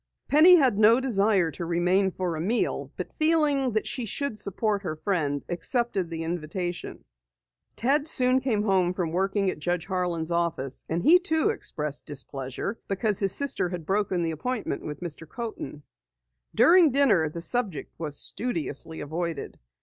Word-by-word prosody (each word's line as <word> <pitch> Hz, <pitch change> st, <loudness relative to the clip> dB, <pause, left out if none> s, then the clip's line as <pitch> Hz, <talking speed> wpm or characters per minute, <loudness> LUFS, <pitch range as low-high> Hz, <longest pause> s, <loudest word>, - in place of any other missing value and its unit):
Penny 320 Hz, +5 st, +8 dB
had 260 Hz, -, +3 dB
no 225 Hz, +3 st, +6 dB
desire 200 Hz, -8 st, +2 dB
to 175 Hz, -, -6 dB
remain 180 Hz, +3 st, +2 dB
for 180 Hz, -2 st, -3 dB
a 155 Hz, -, -4 dB
meal, 220 Hz, +8 st, -1 dB
but -, -, -6 dB
feeling 300 Hz, -5 st, +2 dB
that 215 Hz, -, 0 dB
she 250 Hz, -, -3 dB
should 280 Hz, +3 st, -3 dB
support 205 Hz, +1 st, -1 dB
her 170 Hz, -5 st, -4 dB
friend, 155 Hz, -5 st, -1 dB
accepted 190 Hz, +1 st, -1 dB
the 165 Hz, -1 st, -4 dB
invitation. 175 Hz, +2 st, -4 dB, 0.7 s
Ted 285 Hz, +5 st, +1 dB
soon 255 Hz, -3 st, +3 dB
came 225 Hz, -5 st, 0 dB
home 185 Hz, -3 st, +2 dB
from 175 Hz, -4 st, -2 dB
working 195 Hz, +2 st, 0 dB
at -, -, -9 dB
Judge 175 Hz, +2 st, -2 dB
Harlan's 175 Hz, -3 st, -2 dB
office, 170 Hz, -6 st, -1 dB
and 170 Hz, +2 st, -1 dB
he 350 Hz, +3 st, +7 dB
too 345 Hz, +1 st, +1 dB
expressed 150 Hz, -, -4 dB
displeasure 135 Hz, -, -4 dB
because 200 Hz, +1 st, 0 dB
his 195 Hz, -2 st, +1 dB
sister 260 Hz, -5 st, +1 dB
had 175 Hz, -3 st, -6 dB
broken 195 Hz, -2 st, 0 dB
the 165 Hz, -, -1 dB
appointment 230 Hz, +9 st, -3 dB
with 150 Hz, +1 st, -7 dB
Mr. 165 Hz, -2 st, -7 dB
Coaten. 220 Hz, -10 st, -7 dB, 0.7 s
During 345 Hz, -1 st, +6 dB
dinner 240 Hz, -, +3 dB
the 170 Hz, -, -7 dB
subject 200 Hz, -2 st, -2 dB
was 150 Hz, -3 st, -4 dB
studiously 165 Hz, -, -2 dB
avoided. 160 Hz, 0 st, -4 dB
190 Hz, 155 wpm, -26 LUFS, 165-240 Hz, 0.7 s, Penny